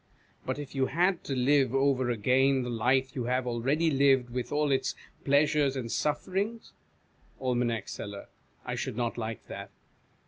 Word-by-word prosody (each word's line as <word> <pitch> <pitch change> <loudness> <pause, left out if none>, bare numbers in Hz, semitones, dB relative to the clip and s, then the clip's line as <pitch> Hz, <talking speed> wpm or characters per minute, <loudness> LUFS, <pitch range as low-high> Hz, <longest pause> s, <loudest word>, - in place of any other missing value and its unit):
But 130 - -1
if 145 -2 -7
you 135 -1 +1
had 175 +4 +1
to 135 - -2
live 135 0 +3
over 135 -2 +2
again 130 +4 +2
the 125 - -4
life 130 +3 +1
you 125 -3 -2
have 125 +1 0
already 135 +7 +1
lived, 135 -3 +3
with 125 0 -4
all 150 -1 +1
its 135 0 0 0.3
pleasures 145 0 +3
and 120 -4 -4
sufferings? 190 +9 -2 0.7
Aim. 125 -2 0
Seller. 100 -1 -7 0.4
I - - -3
should - - -4
not 120 -2 -1
like 110 -1 -5
that. 100 0 -8
130 Hz, 160 wpm, -29 LUFS, 125-145 Hz, 0.7 s, live